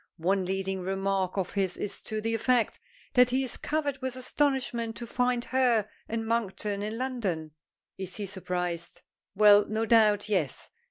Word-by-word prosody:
One 185 +3 +1
leading 190 0 -2
remark 195 0 -1
of 185 -2 -1
his 190 -3 0
is 205 - -4
to 215 0 -3
the 225 +1 -1
effect 235 +1 +1 0.3
that 250 0 +6
he 260 +2 +1
is 255 - -1
covered 290 -3 -2
with 260 -1 -3
astonishment 255 -3 -1
to 235 - -6
find 245 0 0
her 245 -5 +2 0.2
and 225 0 -2
Monkton 210 -3 -1
in 215 +2 -3
London. 210 -12 -2 0.5
Is 185 -1 -5
he 210 - -3
surprised. 180 -3 -4 0.3
Well, 205 0 +7
no 220 +1 -1
doubt, 215 -2 +4
yes. 185 -10 -1
215 Hz, 160 wpm, -28 LUFS, 190-245 Hz, 0.5 s, Well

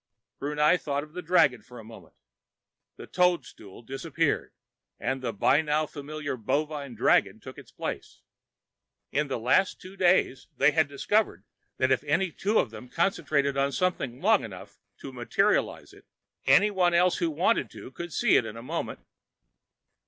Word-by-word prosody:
Brunei 150 +4 +2
thought 145 -3 -3
of 150 0 -14
the 180 - -5
dragon 145 -9 +3
for 125 +3 -14
a 115 - -10
moment. 110 +1 -14 0.8
The - - -10
toadstool 175 - -1
disappeared, 145 +5 -2 0.5
and 135 0 -2
the 120 -2 -2
by 130 +8 +3
now 155 0 0
familiar 145 -1 -6
bovine 145 +2 -2
dragon - - +2
took - - -11
its - - -15
place. - - -6 0.9
In 150 +1 0
the 135 - -2
last 125 +12 +2
few 185 +1 -12
days, 180 -8 +2
they 140 +2 +5
had 160 -1 +2
discovered 140 - 0 0.3
that 130 0 +1
if 130 - +2
any 170 +5 +1
two 210 +7 0
of 115 - +1
them 125 +2 -11
concentrated 150 -4 0
on 140 0 +1
something 140 -7 -2
long 220 +7 +3
enough - - -10 0.2
to - - -8
"materialize" - - 0
it, - - -19 0.4
anyone 190 -4 +4
else 180 +1 +3
who 170 -2 0
wanted 175 +9 +1
to - - -11
could 170 +4 -7
see - - +3
it - - +2
in 110 +1 -8
a 115 - -9
moment. 160 +6 -4
150 Hz, 160 wpm, -27 LUFS, 135-175 Hz, 0.9 s, they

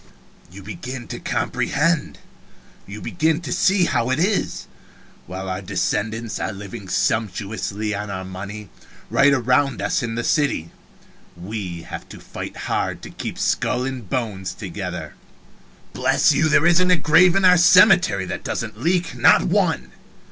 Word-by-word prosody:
"You 100 +2 -11
begin 125 - -7
to - - -5
comprehend 165 +1 -1 0.7
you 105 +2 -8
begin 160 -1 0
to 135 -7 -4
see 190 -2 +3
how 120 -6 0
it 130 - +1
is. 190 +5 0 0.6
While 95 +1 -6
our 95 0 -3
descendants 105 +4 -2
are - - -2
living 100 0 -9
sumptuously 105 0 -1
on 105 0 -4
our 95 -1 -5
money, 95 +2 -8 0.4
right 140 +1 +5
around 130 0 +2
us - - 0
in 115 -2 -3
the 120 - -2
city, 140 - 0 0.7
we 90 -2 -6
have - - -8
to - - -10
fight - - -8
hard - - -2
to - - -9
keep - - -6
skull 125 0 0
and 130 -7 -6
bones 105 -7 -3
together. 90 -5 -6 0.8
Bless - - +3
you, 155 0 +2
there 155 +1 +4
isn't 175 +1 +4
a 180 - +6
grave 165 +3 +5
in 195 -1 +3
our 180 0 +7
cemetery 175 - +5
that 90 - -5
doesn't - - -4
leak 175 0 0
not - - +5
one. 60 +1 0
115 Hz, 150 wpm, -21 LUFS, 95-155 Hz, 0.8 s, our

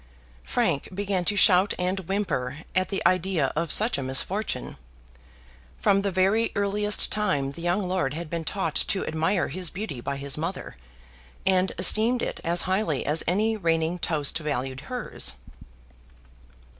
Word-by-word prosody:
Frank 135 - 0
began 195 -1 -2
to 205 - +1
shout 190 -1 +5
and 180 +2 -1
whimper 145 -10 -2 0.2
at 185 +1 +1
the 195 - -3
idea 185 -6 +1
of 165 0 -1
such 220 -5 +3
a - - -2
misfortune. 135 +4 -1 1.0
From 200 -1 +3
the 200 - 0
very 195 +5 +2
earliest 205 +1 +1
time 145 -11 0
the 150 - -10
young 180 +3 0
lord 180 -7 -1
had 170 +1 -5
been 165 +1 -4
taught 165 -2 -2
to 195 - 0
admire 165 +4 0
his 180 -2 -1
beauty 180 - -5
by 140 +2 -3
his 140 +1 -5
mother: 170 +4 -4 0.7
and 190 0 +3
esteemed 220 +7 +5
it - - -3
as 170 +1 +1
highly 185 -7 0
as 150 +2 +1
any 215 +5 +2
reigning 165 -2 0
toast 160 -2 0
valued 135 -4 -3
hers. 250 -2 -2
180 Hz, 150 wpm, -26 LUFS, 155-200 Hz, 1.0 s, shout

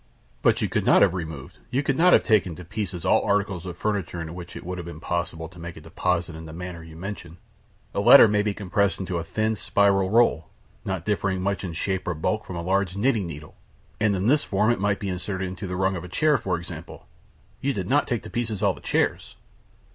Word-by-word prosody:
"But - - +3
you - - +2
could - - -1
not - - +6
have - - +3
removed 80 -6 -6
you 135 +3 0
could 135 - +1
not 180 +4 +5
have - - +6
taken 100 -7 +2
to 90 - -10
pieces 90 -2 -4
all - - +4
articles 100 -3 0
of 85 -1 -6
furniture 100 -5 -2
in 80 0 -5
which 90 0 -9
it - - -8
would 90 0 -4
have 85 - -6
been 85 -2 -8
possible 85 -1 -3
to 90 0 -15
make 85 0 -7
a - - -10
deposit 85 +1 -1
in 80 0 -8
the 80 - -9
manner 90 0 -7
you 80 -1 -12
mention. 85 -1 -7 0.6
A - - -1
letter 120 +4 +9
may 105 0 +2
be 105 -1 -1
compressed 100 0 0
into 90 -2 -2
a - - -4
thin 110 +5 -1
spiral 100 0 +2
roll, 100 -8 +3 0.3
not 95 -3 -3
differing 100 -2 0
much 100 +1 -1
in 90 -3 -4
shape 95 +2 -2
or 90 - -1
bulk 110 +8 -1
from 95 - -6
a 85 - -4
large 95 +1 0
knitting 110 -4 +1
needle, 75 -2 -9 0.5
and 105 -2 +2
in 95 +1 -1
this 145 +5 +4
form 105 +3 +2
it 120 - 0
might 100 0 +1
be 100 - -4
inserted 95 +1 -3
into 95 +1 -6
the 90 - -4
rung 95 +1 +1
of 85 - -5
a 90 - -9
chair, 150 - +2
for 90 -2 -1
example. 85 -1 -9 0.6
You 140 - +1
did 95 -8 -3
not 145 +5 +2
take 120 -4 -2
to - - -8
pieces 110 -4 -2
all 100 -2 +4
the - - -14
chairs?" - - -1
95 Hz, 240 wpm, -25 LUFS, 85-105 Hz, 0.6 s, letter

